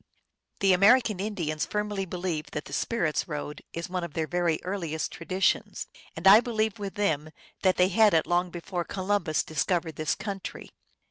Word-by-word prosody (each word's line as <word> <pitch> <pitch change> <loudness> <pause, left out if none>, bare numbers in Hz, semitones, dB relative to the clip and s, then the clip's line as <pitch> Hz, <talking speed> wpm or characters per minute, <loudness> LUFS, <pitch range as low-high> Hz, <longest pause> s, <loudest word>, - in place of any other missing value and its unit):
The 195 -1 +5
American 210 +2 +5
Indians 175 -7 -2
firmly 210 -2 -2
believe 175 -3 -3
that 150 - -4
the 140 - -10
Spirits 170 - 0
Road 150 -2 -5
is 170 0 -5
one 180 -1 -3
of 170 -4 -6
their 160 - 0
very 175 -1 0
earliest 170 -5 -3
traditions, 185 +2 0 0.3
and 165 - -7
I 195 +3 +10
believe 220 -3 -1
with 200 -1 -5
them 155 -7 0 0.3
that 185 -1 +3
they 180 +1 +4
had 210 0 +5
it 160 - +3
long 175 +1 +1
before 175 +1 -4
Columbus 185 -4 0
discovered 165 +1 -1
this 155 +1 0
country. 195 -3 -6
180 Hz, 170 wpm, -27 LUFS, 160-200 Hz, 0.3 s, I